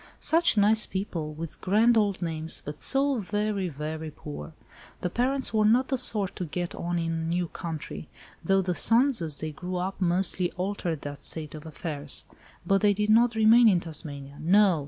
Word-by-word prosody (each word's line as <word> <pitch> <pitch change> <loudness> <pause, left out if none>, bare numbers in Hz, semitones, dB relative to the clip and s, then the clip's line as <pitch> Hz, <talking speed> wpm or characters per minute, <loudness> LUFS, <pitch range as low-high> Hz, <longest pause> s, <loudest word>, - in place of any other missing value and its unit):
Such 330 -7 +3
nice 215 +1 +4
people, 175 -5 -4
with 165 0 -8
grand 220 +5 +3
old 205 -4 +1
names, 160 -1 -1
but 150 - -7
so 275 -1 +3
very, 205 -1 -2
very 155 +1 -5
poor. 75 - -9 0.5
The 180 - -2
parents 265 +4 -1
were 215 -1 +3
not 240 +5 +3
the 265 - 0
sort 205 -6 +2
to 180 - -3
get 175 +2 -4
on 175 0 -3
in 165 -1 -1
a - - -2
new 175 +1 -1
country, 160 -3 -7 0.3
though 195 +3 +2
the 180 -1 -1
sons, 240 +5 +3
as 155 -4 -1
they 155 0 -3
grew 180 +5 -6
up, 185 +2 -3
mostly 180 0 +1
altered 180 -4 -3
that 145 -1 -7
state 155 -2 -2
of 155 +1 -9
affairs. 150 -2 -4 0.4
But 195 +2 +2
they 205 -1 +3
did 210 +1 +1
not 235 +1 +4
remain 225 +2 +6
in 190 -5 +4
Tasmania. 145 -4 -6
No! 190 0 +4
180 Hz, 185 wpm, -27 LUFS, 160-215 Hz, 0.5 s, remain